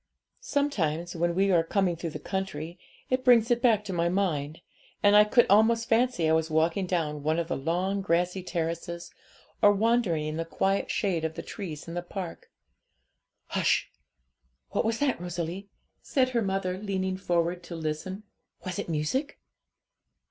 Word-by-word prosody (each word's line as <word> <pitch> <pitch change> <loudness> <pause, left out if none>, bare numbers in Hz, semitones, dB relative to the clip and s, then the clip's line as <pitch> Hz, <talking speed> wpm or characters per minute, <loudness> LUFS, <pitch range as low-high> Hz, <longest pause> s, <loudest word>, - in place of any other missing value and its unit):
Sometimes, 185 - -1
when 170 0 0
we 195 +1 +3
are 170 -2 +5
coming 180 0 +1
through 165 0 -4
the - - -6
country, 175 -3 -4 0.3
it 255 0 +1
brings 240 -2 +5
it 240 0 +2
back 220 -4 +3
to 195 - -4
my 170 0 +1
mind, 165 -5 -1 0.4
and 205 0 +6
I 210 - +9
could 235 +3 +4
almost 225 +3 +4
fancy 230 -7 +2
I 160 - +3
was 160 0 +1
walking 165 +4 +1
down 155 -5 -1
one 155 +2 0
of 170 -1 -1
the - - 0
long 180 +7 -1
grassy 180 0 0
terraces, 170 0 -4 0.5
or 205 - +7
wandering 205 -7 +1
in 155 +1 -3
the 165 - -1
quiet 195 +4 0
shade 180 -6 0
of 160 0 -2
the - - -6
trees 170 -8 -7
in 165 - -6
the 175 - -2
park. 175 0 -7 1.0
Hush! - - +1 0.8
what - - 0
was 225 0 +1
that, 270 -9 0
Rosalie?' 175 +3 -4 0.3
said 260 -3 +1
her 240 -2 0
mother, 190 -2 -1
leaning 190 -2 -2
forward 175 -1 0
to 170 - -7
listen; 165 +5 -4 0.4
'was 185 -1 -3
it - - -4
music?' 165 - -2
180 Hz, 170 wpm, -28 LUFS, 165-205 Hz, 1.0 s, I